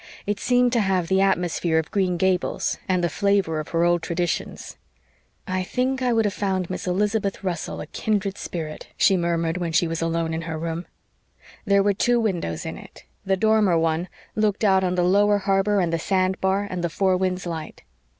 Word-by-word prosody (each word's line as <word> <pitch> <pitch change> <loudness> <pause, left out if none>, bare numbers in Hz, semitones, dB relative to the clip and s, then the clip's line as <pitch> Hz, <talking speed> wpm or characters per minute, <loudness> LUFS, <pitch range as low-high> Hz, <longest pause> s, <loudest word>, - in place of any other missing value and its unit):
It 205 -1 -2
seemed 245 0 +2
to 235 - +3
have 190 -4 0
the 190 0 +3
atmosphere 175 -3 +1
of 160 0 -1
Green 185 -3 +1
Gables 185 0 0
and 185 -1 +1
the - - +3
flavor 200 -4 +1
of 155 - -5
her 165 0 0
old 175 0 +3
traditions. 170 +1 -3 0.7
"I 185 0 -1
think 255 +7 -1
I 250 -1 +1
would 225 -2 +2
have 205 - 0
found 190 -3 -2
Miss 185 - -5
Elizabeth 200 +2 0
Russell 175 -4 -3
a - - -6
'kindred 200 +3 -2
spirit,'" 160 -6 -6
she 195 - +4
murmured 170 -1 0
when 175 -2 -2
she 170 +1 +2
was 165 0 -3
alone 165 0 -1
in 160 - -2
her 160 -1 -4
room. 165 +2 -4 0.8
There 200 -1 +4
were 205 0 +3
two 240 +4 +2
windows 175 - -2
in - - -5
it; - - -14 0.2
the 190 0 +2
dormer 215 -4 +3
one 165 +2 0 0.3
looked 215 -1 0
out 190 -2 +4
on 180 -1 0
the 180 - +2
lower 205 +3 +4
harbor 195 +1 +1
and 170 -3 0
the 165 - 0
sand 185 +1 0
bar 190 +1 +1
and 180 -3 -4
the 170 - 0
Four 190 +2 +1
Winds 185 0 -1
light. 165 -3 -6
185 Hz, 200 wpm, -23 LUFS, 170-200 Hz, 0.8 s, she